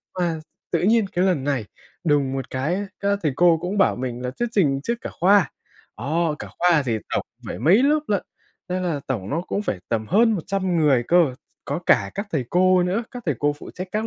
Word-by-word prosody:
qua 170 Hz, -3 st, -1 dB, 0.3 s
tự -, -, +1 dB
nhiên 220 Hz, +2 st, +3 dB
cái 180 Hz, +2 st, +1 dB
lần 175 Hz, -8 st, +1 dB
này 140 Hz, -6 st, 0 dB, 0.4 s
đùng 145 Hz, -4 st, +2 dB
một 135 Hz, 0 st, -4 dB
cái 135 Hz, +7 st, -1 dB
á, 200 Hz, +1 st, -3 dB
các 200 Hz, 0 st, +1 dB
thầy 150 Hz, -4 st, +1 dB
cô 170 Hz, -1 st, +5 dB
cũng 185 Hz, +4 st, -3 dB
bảo 195 Hz, -, +3 dB
mình 125 Hz, -1 st, -4 dB
là 125 Hz, -, -2 dB
thuyết 240 Hz, -, 0 dB
trình 140 Hz, -, +2 dB
trước 235 Hz, -, -1 dB
cả -, -, -6 dB
khoa. 195 Hz, -2 st, +4 dB, 0.5 s
Đó, 155 Hz, +5 st, 0 dB
cả -, -, -7 dB
khoa 175 Hz, -4 st, +4 dB
thì 115 Hz, -2 st, 0 dB, 0.2 s
tổng -, -, -1 dB, 0.2 s
phải -, -, -5 dB
mấy 175 Hz, -, +5 dB
lớp 300 Hz, +2 st, +3 dB
lận, 200 Hz, -3 st, 0 dB, 0.4 s
thế 185 Hz, +1 st, -1 dB
là 170 Hz, -6 st, -1 dB
tổng 105 Hz, -7 st, -3 dB
nó 160 Hz, +4 st, 0 dB
cũng 200 Hz, +3 st, -3 dB
phải 100 Hz, -, -2 dB
tầm 110 Hz, -2 st, -1 dB
hơn 225 Hz, +5 st, +4 dB
100 190 Hz, -1 st, -1 dB
người 145 Hz, -6 st, +3 dB
cơ, 170 Hz, -7 st, +4 dB, 0.3 s
có 145 Hz, +4 st, -2 dB
cả -, -, +4 dB
các 200 Hz, +2 st, -3 dB
thầy 140 Hz, -6 st, 0 dB
cô 185 Hz, 0 st, +4 dB
nữa, 185 Hz, +6 st, 0 dB
các 245 Hz, -1 st, -8 dB
thầy 150 Hz, -, +1 dB
cô 145 Hz, 0 st, +2 dB
phụ -, -, -10 dB
trách 185 Hz, +1 st, -6 dB
các 215 Hz, +1 st, -1 dB
175 Hz, 230 wpm, -23 LUFS, 140-195 Hz, 0.5 s, cô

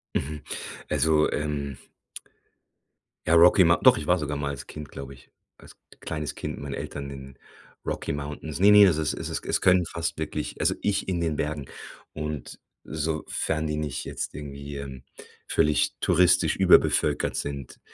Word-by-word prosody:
Mhm. 75 Hz, +1 st, -3 dB, 0.5 s
Also 80 Hz, -1 st, +3 dB
ähm 75 Hz, -3 st, -3 dB, 1.5 s
ja 85 Hz, -, +4 dB
Rocky 90 Hz, +3 st, +7 dB
Mou 85 Hz, 0 st, +5 dB
doch, -, -, +7 dB
ich 75 Hz, -, -5 dB
war 90 Hz, -, +4 dB
sogar 75 Hz, -1 st, -3 dB
mal 70 Hz, 0 st, -2 dB
als 70 Hz, -, -6 dB
Kind, 75 Hz, -1 st, -8 dB
glaube 70 Hz, 0 st, -8 dB
ich, 65 Hz, -, -19 dB, 0.3 s
als -, -, -16 dB, 0.2 s
kleines 75 Hz, -2 st, -4 dB
Kind -, -, -5 dB
mit -, -, -9 dB
meinen 70 Hz, -1 st, -5 dB
Eltern 70 Hz, -1 st, -6 dB
in 70 Hz, -1 st, -10 dB, 0.5 s
Rocky -, -, -3 dB
Mountains. 75 Hz, +2 st, -5 dB
Ne, 100 Hz, +2 st, +7 dB
ne, 105 Hz, -1 st, +9 dB
das 85 Hz, -5 st, +3 dB
ist 80 Hz, -1 st, 0 dB
es -, -, -5 dB
ist -, -, -4 dB
es -, -, 0 dB
können 90 Hz, -2 st, +4 dB
fast 85 Hz, 0 st, -3 dB
wirklich 80 Hz, -1 st, -4 dB
also -, -, +2 dB
ich 100 Hz, -1 st, 0 dB
in 90 Hz, -2 st, -1 dB
den 80 Hz, -2 st, 0 dB
Bergen 75 Hz, -1 st, -2 dB, 0.5 s
und 75 Hz, -3 st, -5 dB, 0.2 s
sofern 80 Hz, 0 st, -2 dB
die 75 Hz, 0 st, -2 dB
nicht 75 Hz, -2 st, -3 dB
jetzt -, -, -4 dB
irgendwie, 70 Hz, 0 st, -7 dB
ähm, 65 Hz, -2 st, -8 dB, 0.4 s
völlig 75 Hz, 0 st, +2 dB
touristisch 90 Hz, 0 st, +4 dB
überbevölkert -, -, +3 dB
sind, 70 Hz, -2 st, -5 dB
75 Hz, 165 wpm, -26 LUFS, 70-80 Hz, 1.5 s, ne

